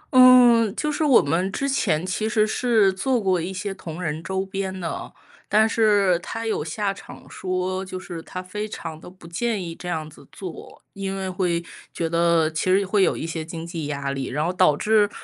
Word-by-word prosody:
嗯， 245 -3 +7
就 300 - -1
是 300 - -1
我 280 -5 +6
们 175 +6 0
之 275 - -2
前 180 - +1
其 215 +4 -1
实 215 -1 +3
是 215 -3 +2
做 250 +6 0
过 190 -4 +1
一 175 +3 -4
些 195 +1 -4
同 170 -3 -8
人 155 -2 -3
周 190 +1 -2
边 190 -1 -4
的， 170 -2 -5 0.4
但 215 +2 +5
是 205 -5 +3
他 225 +6 -5
有 220 -8 -1
下 200 +5 -2
场 195 - -13
说， 185 0 -3
就 185 -1 -6
是 175 -3 -7
他 185 - -7
非 210 +3 -5
常 165 -6 -7
地 175 - -11
不 180 -2 -15
建 205 +4 -2
议 170 -1 -5
这 180 +2 -7
样 160 -3 -3
子 155 - -16
做。 180 -4 -9
因 195 0 -4
为 190 -1 -3
会 180 -2 -1 0.3
觉 165 - -2
得 170 -1 +3
其 160 - -2
实 195 +1 +3
会 195 +2 +2
有 - - +3
一 - - -4
些 165 -1 -4
经 165 0 -7
济 165 -3 -5
压 140 -1 -3
力， 135 -1 -3
然 150 +4 -1
后 175 - -1
导 180 -5 +4
致 210 +1 +3
185 Hz, 230 characters per minute, -23 LUFS, 170-210 Hz, 0.4 s, 嗯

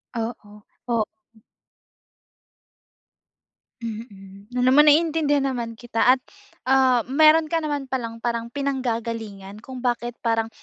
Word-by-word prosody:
Oo, 230 +1 -1 0.6
oo. 230 -2 +2 2.8
Mm. 205 -3 -9
Alam 255 +1 +4
mo, 295 - +8
naiintindihan 300 -2 +3
naman 230 -2 -5
kita 240 +2 +2
at, - - -21 0.5
ah, 260 -3 +3
meron 310 +4 +5
ka 330 +1 -1
naman 290 -3 -3
palang 235 -3 -4
parang 235 0 -3
pinanggagalingan 230 -7 -4
kung 255 0 -9
bakit 240 0 -1
parang, 225 -1 +1
240 Hz, 105 wpm, -23 LUFS, 230-275 Hz, 2.8 s, mo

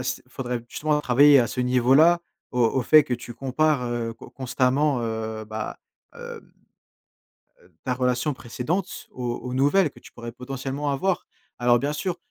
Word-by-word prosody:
s 125 0 -3
faudrait 125 -3 -4
justement 150 0 0
travailler 140 +2 +6
à 120 - +3
ce 125 - -4
niveau-là, 130 +8 +4 0.3
au 125 - -1
au 130 +3 +1
fait 155 +4 +6
que 125 - -1
tu 120 0 -9
compares, 135 +1 +1
heu, 120 -1 -3
con - - -13
constamment, 130 +1 +1
heu, 110 -1 -4
bah, 110 0 -6 0.4
hem, - - -12 1.4
heu, 90 0 -24
ta 125 - 0
relation 125 +3 0
précédente 150 +11 -3
s - - -9
aux 120 -1 -4
aux 125 0 -5
nouvelles 145 +6 +3
que - - -17
tu - - -16
pourrais 115 0 -8
potentiellement 135 +3 -4
avoir. 180 +6 -1 0.3
Alors 120 0 +4
bien 145 +2 -1
sûr 175 +4 -3
130 Hz, 170 wpm, -24 LUFS, 120-145 Hz, 1.4 s, travailler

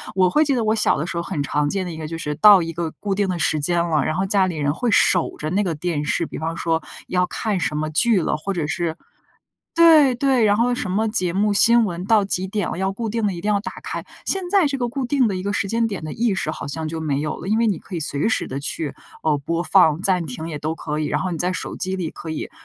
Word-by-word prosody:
我 185 -1 +4
会 300 +12 +3
记 280 -3 +1
得 235 - 0
我 215 0 +2
小 220 - +2
的 155 - -2
时 170 - -4
候， - - 0
很 155 -7 -3
常 145 0 0
见 195 +1 -2
的 175 - -5
一 160 - -8
个 155 -1 -5
就 165 +1 -5
是 150 -2 -3
到 200 +2 +7
一 165 0 -5
个 170 0 -3
固 200 -1 -2
定 195 0 0
的 180 - -1
时 155 -1 +1
间 170 +4 +1
了， 155 -3 +1
然 155 - -1
后 190 +2 0
家 195 -1 +2
里 175 - -4
人 145 -1 0
会 245 +7 -2
守 180 -3 +3
着 155 +1 -4
那 200 +3 +1
个 175 -4 -2
电 155 -1 -2
视， 160 +3 0
比 - - -7
方 165 +1 -3
说 165 -1 0 0.3
要 180 0 +1
看 210 -1 -2
什 150 -3 -1
么 155 0 -1
剧 225 +6 +4
了， 165 - 0
或 195 +6 -4
者 170 -5 -2
是 160 +2 -2 0.8
对， 315 -6 +6
对， 260 -2 +2
然 205 -1 +3
后 245 +2 +2
什 215 -6 -3
么 215 +4 0
节 185 -5 0
目 205 +3 +1
新 235 +3 +6
闻， 180 -3 -4
到 210 0 +3
几 190 -1 0
点 205 -2 -2
了 - - -4
要 190 +1 -1
固 225 +3 -4
定 225 0 -2
地 200 - 0
一 175 - -6
定 205 +4 -1
要 200 - +1
打 210 - -6
开， - - -5 0.2
现 385 -1 +1
在 390 -4 +4
这 280 -1 -1
个 245 -2 -2
固 255 +1 -3
定 265 -3 +2
的 195 - -2
一 185 - -4
个 200 - -1
时 200 -1 -1
间 230 +1 +1
点 200 -6 -5
的 155 - -5
意 230 -2 0
识， 190 - -2
好 - - -6
像 160 +2 -4
就 160 +1 -5
没 145 -3 -1
有 150 0 -3
了， - - -8
因 215 - +2
为 230 - +2
你 190 - -1
可 190 - -11
以 170 - -2
随 145 +3 -1
时 - - 0
地 135 - -4
去， 150 +1 -3 0.3
呃， 155 -2 +1
播 165 +4 -2
放 175 -4 +4
暂 180 -4 +2
停 160 +4 -6
也 150 - -5
都 155 +2 -3
可 150 -1 -4
以， 155 - -1
然 150 - -1
后 185 - -2
你 165 - -4
在 180 +2 0
手 185 - -5
机 185 0 -2
里 170 -4 -3
可 160 - -8
以 160 - -5
185 Hz, 320 characters per minute, -21 LUFS, 160-210 Hz, 0.8 s, 到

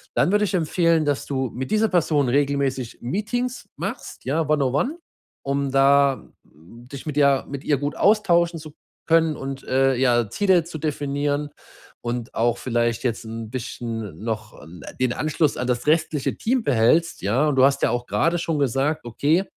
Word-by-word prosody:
Dann - - +3
würde 210 +1 +3
ich 200 - -4
empfehlen, 165 -1 +2
dass 145 -1 -1
du 130 -3 -2
mit 130 +1 -5
dieser 215 0 +2
Person 155 -7 +2
regelmäßig 135 -2 0
Meetings 230 - -3
machst, - - -6
ja? 150 +3 0
One 150 -2 +2
on 130 - -1
one, 285 - 0 0.5
um 140 0 -1
da 135 0 +4 0.2
dich 120 - -13
mit 150 -2 -4
ja 140 -2 +3
mit 140 0 -6
ihr 145 - +2
gut 145 +2 -3
austauschen 175 -5 +3
zu 150 -1 -11 0.3
können 165 -2 +3
und, 135 0 -6
äh, 135 0 +2
ja, 120 -3 +2
Ziele 190 - +3
zu 165 0 -8
definieren 145 -1 -2 0.5
und 120 0 -4
auch 120 +1 +1
vielleicht 120 -2 -1
jetzt 120 -3 -2
'n 115 0 -6
bisschen 115 -6 -5
noch 110 -2 -4
'n 85 +4 -12 0.2
den 125 -2 +2
Anschluss 155 -1 0
an 125 - -2
das 125 +1 -1
restliche 155 -2 +1
Team 245 +1 0
behältst, 140 - +2
ja? 130 +10 +2
Und 135 - -1
du 130 - +7
hast 140 0 +2
ja - - +3
auch 120 0 -2
grade 160 - +1
schon 165 -2 -2
gesagt: 140 +3 0
„Okay, 145 +9 +1
140 Hz, 180 wpm, -23 LUFS, 120-160 Hz, 0.5 s, du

